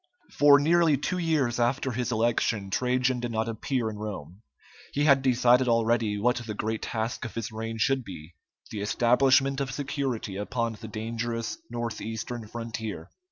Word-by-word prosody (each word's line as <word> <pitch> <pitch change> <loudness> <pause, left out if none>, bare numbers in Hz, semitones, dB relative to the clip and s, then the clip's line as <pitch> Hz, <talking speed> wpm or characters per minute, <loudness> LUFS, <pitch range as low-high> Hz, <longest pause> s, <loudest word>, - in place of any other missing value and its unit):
For 145 -1 +8
nearly 160 0 +4
two 180 +6 -2
years 150 -8 +1
after 130 +3 +1
his 120 +1 -2
election 110 -3 0
Trajan 125 +2 +1
did 120 0 -3
not 110 0 -1
appear 115 +2 -2
in 110 -1 -5
Rome. 100 -3 -7 0.5
He 145 - +1
had 140 -2 +5
decided 125 0 +4
already 115 -2 +2
what 125 +4 +2
the 115 -3 -5
great 110 +1 -2
task 115 +2 -3
of 120 - -6
his 115 -2 -4
reign 115 +1 -5
should 130 +3 +1
be 90 -5 -10 0.4
the 105 - -4
establishment 135 +5 +3
of 135 -1 -2
security 135 -8 -3
upon 115 +2 -2
the 110 +1 -9
dangerous 115 +1 -4
north 120 -1 -4
eastern 110 +1 -5
frontier. 115 -1 -6
120 Hz, 160 wpm, -27 LUFS, 110-130 Hz, 0.5 s, For